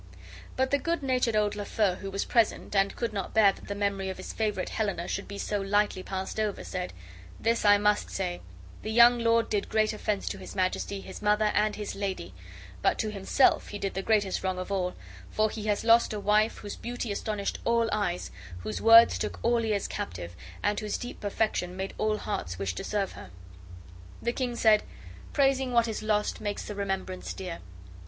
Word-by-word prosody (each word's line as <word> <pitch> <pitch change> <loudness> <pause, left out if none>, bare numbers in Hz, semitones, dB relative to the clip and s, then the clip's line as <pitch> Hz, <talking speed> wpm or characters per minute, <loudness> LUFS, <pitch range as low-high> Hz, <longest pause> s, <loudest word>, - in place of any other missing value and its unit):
But 260 0 +1
the 285 - +3
good 335 +1 -1
natured 250 -4 +1
old 210 -1 +2
Lafeu, 205 -2 0
who 195 - -5
was 195 +1 -2
present, 230 -2 +1
and 195 0 +2
could 235 -2 -2
not 195 -2 -4
bear 210 -3 +7
that - - -14
the 200 - -3
memory 200 -1 -1
of 190 - -5
his 185 - -7
favorite 210 -4 -1
Helena 200 -5 -2
should 195 - -3
be 200 - -7
so 205 0 -2
lightly 205 -1 +1
passed 190 +2 -4
over, 215 -2 -1
said, 180 -1 -4 0.5
"This 230 +1 +1
I 205 0 +7
must 210 0 +2
say, 180 -2 -3 0.4
the - - -5
young 235 +2 +7
lord 230 0 +3
did 205 -2 -1
great 215 0 +2
offense 210 -1 -2
to - - -5
his - - -9
Majesty, 190 +1 -1
his - - -9
mother, 210 0 +3
and 210 0 +2
his 210 -1 -5
lady; 190 - -4 0.5
but - - +2
to 215 - -1
himself 205 +6 +3
he 205 - -6
did 195 -1 -3
the 190 - -2
greatest 200 -2 +1
wrong 185 -1 -1
of 185 +2 -5
all, 180 -2 -1 0.3
for 215 0 +1
he 215 -1 -6
has 205 -1 +1
lost 230 0 +5
a 210 - -3
wife 210 +2 +2
whose 205 -1 -7
beauty 240 -2 -4
astonished 200 0 -2
all 230 0 +2
eyes, 200 -4 -1 0.3
whose 105 - -4
words 230 +1 +8
took - - -3
all 235 0 +2
ears 210 -3 0
captive, 85 0 -5 0.4
whose 210 -1 -2
deep 245 - -7
perfection 200 -3 -1
made 190 +1 -4
all 215 0 +1
hearts 90 - -4
wish 95 -1 -2
to - - -5
serve 205 -2 -1
her." - - -11 0.9
The 235 - -1
king 250 -2 -2
said: 220 -2 +5 0.5
"Praising 270 -2 +2
what 235 -1 +4
is 220 - -3
lost 210 -1 0
makes 205 -1 -3
the 210 - -5
remembrance 195 -2 -3
dear. 180 -3 -6
210 Hz, 200 wpm, -28 LUFS, 195-225 Hz, 0.9 s, words